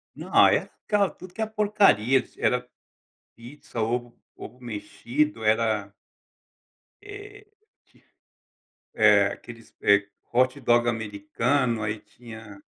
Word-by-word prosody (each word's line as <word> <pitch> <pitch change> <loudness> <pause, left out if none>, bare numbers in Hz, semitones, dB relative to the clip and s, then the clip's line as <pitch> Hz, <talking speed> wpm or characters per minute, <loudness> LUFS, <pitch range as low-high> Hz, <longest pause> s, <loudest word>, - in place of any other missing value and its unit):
Não, - - +4
era 205 -2 0
tudo 185 0 -13
que 220 - -4
é - - 0
porcaria, 200 - +3
era 125 0 0 0.7
pizza, 120 0 -9
ovo, 120 +1 -2 0.2
ovo 125 +3 -11
mexido, 120 +3 -3
era 110 -2 +1 1.1
Eh. 410 0 -11 1.5
É 105 -2 +5
aqueles, 115 +3 -9
eh, 100 0 +4 0.3
hot 130 +3 +2
dog 120 0 +3
americano, 115 +3 -1
aí 105 0 -2
tinha 110 -1 -13
120 Hz, 100 wpm, -25 LUFS, 110-140 Hz, 1.5 s, É